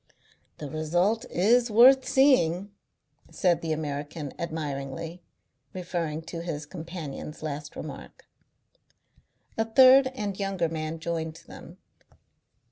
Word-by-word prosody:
"The 150 - -6
result 175 - 0
is 235 +7 +3
worth 255 +5 +6
seeing," 205 - +3 0.6
said 180 -4 +1
the 165 - -3
American 150 -1 -4
admiringly, 160 +1 -5 0.5
referring 170 -4 -3
to 165 +1 -6
his 155 -3 -5
companion's 160 -3 -8
last 150 -1 -5
remark. - - -9 1.3
A 225 - +2
third 260 +3 +7
and 205 -5 -4
younger 195 -4 -1
man 155 0 -4
joined 160 -1 -4
them. - - -12
170 Hz, 105 wpm, -27 LUFS, 155-205 Hz, 1.3 s, third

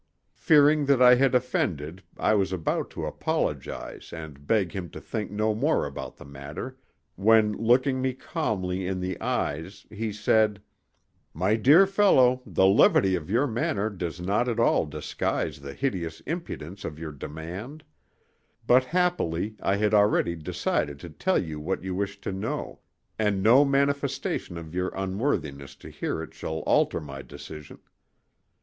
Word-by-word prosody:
Fearing 150 -1 +4
that 140 -2 +4
I 125 -1 +8
had 130 +1 +3
offended 90 - -1 0.2
I - - +2
was 95 -2 +1
about 90 -4 -1
to - - -5
apologize - - -3
and 75 -3 -9
beg 100 -6 +2
him 90 -3 -5
to - - -9
think 105 -2 -4
no 110 +1 0
more 145 +9 +1
about 70 - -7
the - - -12
matter, 70 - -8 0.4
when 105 +2 +4
looking 130 +4 +2
me 130 0 0
calmly 95 - -3
in 95 0 -2
the 90 0 -4
eyes 80 +7 -3
he 110 +1 -3
said: 105 0 +2 0.8
"My 95 +6 +2
dear 145 - +6
fellow, 160 -11 +4
the 95 - +2
levity 95 -1 +5
of 85 -2 -3
your 120 +7 +2
manner 110 -4 -1
does 85 -3 -5
not 100 +7 0
at 120 -1 -2
all 115 -8 +3
disguise 75 -1 -3
the 70 0 -8
hideous 90 - -2
impudence 100 - -6
of 75 - -6
your 80 -1 -6
demand; 85 - -8 0.8
but 130 +1 +5
happily 130 - 0
I 100 - +1
had 105 +1 +1
already 105 -4 +3
decided 75 -2 -2
to 85 - -9
tell 190 - 0
you 80 -3 -3
what 90 +6 -3
you 95 -1 -3
wish 100 +1 -3
to - - -4
know, 95 0 -4 0.4
and 105 -3 +1
no 125 +6 +7
manifestation 140 -9 -1
of 80 -1 -9
your 90 +1 -1
unworthiness 95 - -2
to - - -12
hear - - -3
it - - -11
shall 80 0 -4
alter - - +2
my 70 -3 -8
decision. 75 +2 -10
100 Hz, 155 wpm, -26 LUFS, 85-125 Hz, 0.8 s, I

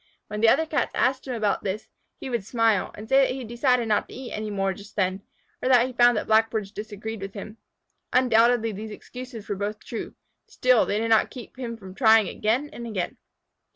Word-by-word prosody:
When 210 0 -4
the 225 - +6
other 320 +7 +4
Cats 295 -6 -1
asked 260 +1 +1
him 255 - -2
about 215 -3 0
this, 200 +2 -3 0.3
he - - -6
would 235 -5 -2
smile, 225 -2 +1
and 215 - -9
say 270 +3 +5
that 260 -1 +1
he 265 - -5
decided 240 +1 +1
not 215 - +1
to - - -10
eat 255 -1 -7
any 215 0 -4
more 195 -1 0
just 200 +2 -13
then, 190 -1 0 0.4
or 255 - 0
that 250 -2 +7
he 245 - +1
had 250 - -12
found 240 -1 +6
that - - -2
Blackbirds 220 -2 +2
disagreed 215 0 -6
with 195 +1 -7
him. 210 +2 -8 0.5
Undoubtedly 235 -2 +4
these 215 +2 -7
excuses 245 +1 -9
were 205 - -2
both 205 +2 -3
true, 230 - -6 0.3
still 255 -2 +3
they 205 - 0
did 225 +1 -1
not 220 -1 +4
keep 250 -3 -10
him 240 -3 -5
from 190 -4 -11
trying 220 -2 +5
again 235 +7 0
and 235 0 -7
again. 190 -6 -3
225 Hz, 220 wpm, -25 LUFS, 210-245 Hz, 0.5 s, that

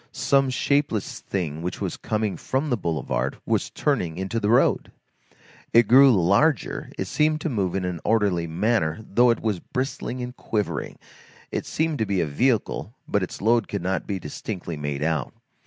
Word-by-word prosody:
Some 135 -1 +2
shapeless 140 -4 0
thing 80 -5 -3
which 90 +1 -4
was 95 -4 -3
coming 110 -3 -2
from 135 +3 -2
the - - +4
boulevard 80 - -2
was - - 0
turning 85 -1 -1
into 95 +5 -2
the 105 -1 0
road. 120 - +3 0.8
It 115 -2 +6
grew 135 +3 +8
larger, 100 - +2
it - - -2
seemed 155 0 +1
to 160 - -1
move 100 -8 -1
in 95 -1 -1
an 90 -3 -3
orderly 100 -7 +2
manner, 85 -1 +1
though 120 +4 +4
it 115 - +1
was 105 -5 -1
bristling 130 +1 -4
and 125 +1 -6
quivering; 105 -4 -3 0.5
it - - -3
seemed 160 -2 -1
to 110 - 0
be 100 -2 0
a 85 - +2
vehicle, 110 - 0
but 105 - +1
its 95 - -5
load 115 0 +3
could 100 -3 -4
not 95 +1 -1
be 100 - -1
distinctly 85 +1 -6
made 75 -1 -3
out. 80 -4 -1
105 Hz, 175 wpm, -24 LUFS, 90-125 Hz, 0.8 s, grew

